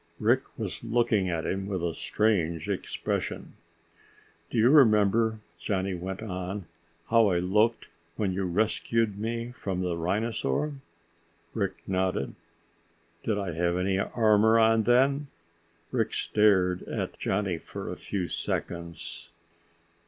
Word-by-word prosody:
Rick 120 Hz, +5 st, +3 dB, 0.2 s
was 95 Hz, -8 st, -5 dB
looking 110 Hz, -5 st, +1 dB
at 85 Hz, -2 st, -2 dB
him 95 Hz, 0 st, -2 dB
with 95 Hz, -4 st, -3 dB
a 85 Hz, -1 st, 0 dB
strange 85 Hz, -8 st, 0 dB
expression. -, -, -3 dB, 1.0 s
"Do -, -, -3 dB
you 115 Hz, +4 st, +5 dB
remember," 110 Hz, -4 st, +4 dB, 0.2 s
Johnny 95 Hz, -1 st, -1 dB
went 95 Hz, +3 st, -5 dB
on, 95 Hz, -1 st, -4 dB, 0.4 s
"how 115 Hz, -1 st, +5 dB
I 90 Hz, -3 st, +2 dB
looked 105 Hz, +6 st, +2 dB, 0.3 s
when 100 Hz, -4 st, -1 dB
you 95 Hz, +1 st, -1 dB
rescued 105 Hz, +2 st, 0 dB
me 115 Hz, +2 st, -3 dB
from 95 Hz, -7 st, -4 dB
the 90 Hz, -2 st, -1 dB
rhinosaur?" 105 Hz, -, -1 dB, 0.8 s
Rick 100 Hz, -4 st, -1 dB
nodded. 95 Hz, -6 st, -1 dB, 0.9 s
"Did 110 Hz, -2 st, 0 dB
I 100 Hz, -3 st, -2 dB
have 85 Hz, +2 st, 0 dB
any 95 Hz, +1 st, +1 dB
armor 110 Hz, +1 st, +4 dB
on 115 Hz, 0 st, +5 dB
then?" 135 Hz, +4 st, +3 dB, 0.6 s
Rick -, -, 0 dB
stared 95 Hz, -4 st, +3 dB
at -, -, -4 dB
Johnny 95 Hz, -4 st, -1 dB
for -, -, -8 dB
a -, -, -4 dB
few 95 Hz, -4 st, -3 dB
seconds. 85 Hz, -1 st, -4 dB
100 Hz, 125 wpm, -28 LUFS, 90-110 Hz, 1.0 s, you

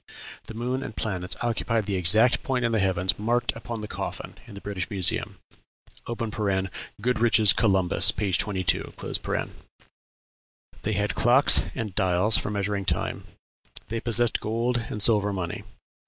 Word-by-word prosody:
the 110 Hz, -, -8 dB
moon 125 Hz, +3 st, -3 dB
and 110 Hz, -, -7 dB
planets 95 Hz, -4 st, -3 dB
occupied 115 Hz, -2 st, -1 dB
the 100 Hz, -, -3 dB
exact 105 Hz, +7 st, +4 dB
point 130 Hz, -5 st, -1 dB
in 115 Hz, -, 0 dB
the 110 Hz, -, +1 dB
heavens 95 Hz, 0 st, 0 dB
marked 120 Hz, +3 st, 0 dB
upon 115 Hz, 0 st, -6 dB
the 105 Hz, -, -6 dB
coffin -, -, -6 dB
in 105 Hz, -, -11 dB
the -, -, -8 dB
British 100 Hz, -1 st, -5 dB
Museum." 95 Hz, -5 st, +2 dB, 1.6 s
(Goodrich's 115 Hz, -3 st, +4 dB
"Columbus," 95 Hz, -5 st, +3 dB
p. 100 Hz, -3 st, -1 dB
22.) 95 Hz, -2 st, 0 dB, 1.9 s
They 110 Hz, -, -2 dB
had 105 Hz, +1 st, -1 dB
clocks 125 Hz, +4 st, +4 dB
and 110 Hz, -6 st, -4 dB
dials 95 Hz, +2 st, +2 dB
for -, -, 0 dB
measuring 100 Hz, -1 st, -2 dB
time. -, -, -2 dB, 0.6 s
They 115 Hz, +1 st, -3 dB
possessed 120 Hz, 0 st, +3 dB
gold 115 Hz, +2 st, -1 dB
and 105 Hz, -, -1 dB
silver 105 Hz, -3 st, +3 dB
money. 90 Hz, -3 st, -5 dB
105 Hz, 140 wpm, -25 LUFS, 95-115 Hz, 1.9 s, exact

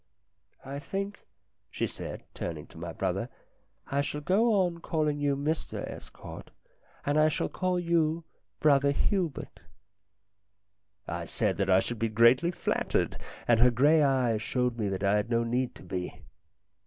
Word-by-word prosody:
" 100 Hz, +1 st, -30 dB
I -, -, -3 dB
think," 195 Hz, +6 st, -5 dB, 0.4 s
she -, -, -1 dB
said, -, -, -6 dB
turning -, -, -5 dB
to -, -, -16 dB
my -, -, -5 dB
brother, -, -, -2 dB, 0.3 s
" -, -, -41 dB
I 140 Hz, +1 st, +2 dB
shall 145 Hz, +1 st, -3 dB
go 210 Hz, +9 st, +3 dB
on 170 Hz, -1 st, -4 dB
calling 155 Hz, -3 st, 0 dB
you 145 Hz, -1 st, +1 dB
Mr 150 Hz, +3 st, -2 dB
Estcourt, -, -, -9 dB, 0.6 s
and 145 Hz, +2 st, +2 dB
I 155 Hz, -, +6 dB
shall 155 Hz, -, -1 dB
call 185 Hz, -1 st, 0 dB
your 170 Hz, -1 st, +1 dB, 0.4 s
brother 140 Hz, -2 st, +4 dB
Hubert." 170 Hz, +2 st, -1 dB, 1.5 s
I 85 Hz, 0 st, -3 dB
said 105 Hz, -1 st, 0 dB
that 100 Hz, -1 st, 0 dB
I 95 Hz, 0 st, +6 dB
should 120 Hz, -2 st, -4 dB
be 115 Hz, -, +1 dB
greatly 115 Hz, +9 st, +5 dB
flattered, 175 Hz, -, -1 dB, 0.3 s
and 120 Hz, -2 st, +5 dB
her 125 Hz, +2 st, +7 dB
grey 145 Hz, +7 st, +4 dB
eyes 130 Hz, -6 st, +2 dB
showed 125 Hz, +1 st, 0 dB
me 105 Hz, -2 st, 0 dB
that 95 Hz, 0 st, -3 dB
I 100 Hz, +1 st, +4 dB
had 105 Hz, +2 st, -1 dB
no 115 Hz, -1 st, +2 dB
need 125 Hz, +2 st, -1 dB
to -, -, -13 dB
be. 90 Hz, -1 st, -5 dB
140 Hz, 165 wpm, -29 LUFS, 115-160 Hz, 1.5 s, her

